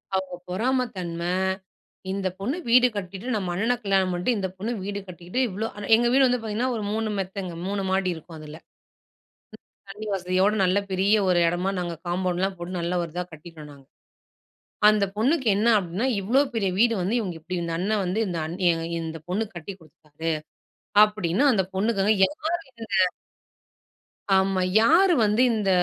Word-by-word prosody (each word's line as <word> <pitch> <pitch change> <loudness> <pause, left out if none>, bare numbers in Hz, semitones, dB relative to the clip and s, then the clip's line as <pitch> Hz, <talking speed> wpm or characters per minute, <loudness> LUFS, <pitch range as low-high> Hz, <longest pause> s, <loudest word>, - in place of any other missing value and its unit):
அவங்க 190 -1 -2
பொறாமை 250 +7 +1
தன்ம, 170 -2 -4 0.9
இந்த 195 -1 -1
பொண்ணு 245 - -2
வீடு 250 +1 +6
கட்டிட்டு, 195 +2 -6
நம்ம 185 -4 -2
அண்ணன 225 +7 +1
கல்யாணம் 195 -2 +2
பண்ணிட்டு, 180 +7 0
இந்த 190 -1 -2
பொண்ணு 220 +6 -3
வீடு 200 0 -4
கட்டிட்டு 180 +5 -6
இவ்ளோ 210 +3 -3 0.3
எங்க 240 +1 +1
வீடு 270 0 +5
வந்து 250 -1 +1
பார்த்தீங்கன்னா 225 +4 -1
ஒரு 220 - -3
3 220 0 -1
மெத்தங்க, 190 -1 -4 0.2
3 200 0 -2
மாடி 190 -1 +1
இருக்கும் 160 0 -11
அதுல. 155 0 -10 1.3
தண்ணி 210 +2 -8
வசதியோட, 185 +2 +1
நல்ல 185 +1 +2
பெரிய 195 +3 +3
ஒரு 175 - +4
இடமா 175 +3 0
நாங்க 175 -1 -3
காம்பவுண்ட்லாம் 185 +2 -1
போட்டு, 175 +2 -6
நல்ல 170 +1 -2
ஒரு 165 - -7
இதாக 180 0 -3
கட்டிட்டோம் 155 -1 -11
நாங்க. 140 -2 -16 1.0
அந்த 210 -1 +4
பொண்ணுக்கு 260 +2 +1
என்ன 215 +3 +1
அப்படீன்னா? 190 +5 -2 0.2
இவ்ளோ 230 +8 +2
பெரிய 200 -4 0
வீடு 230 +2 +4
வந்து 190 +6 0
இவுங்க 185 -7 -3
இப்டி 180 +3 -5
இந்த 170 -1 -3
அண்ணன் 205 +2 0
வந்து, 185 +5 -1
இந்த 175 -2 -3
அண்ணி 175 +4 -5 0.3
இ - - -2
இந்த 160 0 -5
பொண்ணுக்கு 200 0 -2
கட்டி 175 +4 -7
குடுத்துடாரு. 155 +1 -6 0.7
அப்படீன்னு 210 +2 0
அந்த 195 -5 +2
பொண்ணுக்கு 200 +1 +1
அத 210 - +3
ஏத்துக்கவே 315 - -2
முடியலங்க. 220 -8 0 1.2
ஆமா. 190 0 +2 0.2
யாரு 345 +10 +5
வந்து 210 +4 +2
இந்த 210 -3 0
195 Hz, 165 wpm, -25 LUFS, 180-220 Hz, 1.3 s, வீடு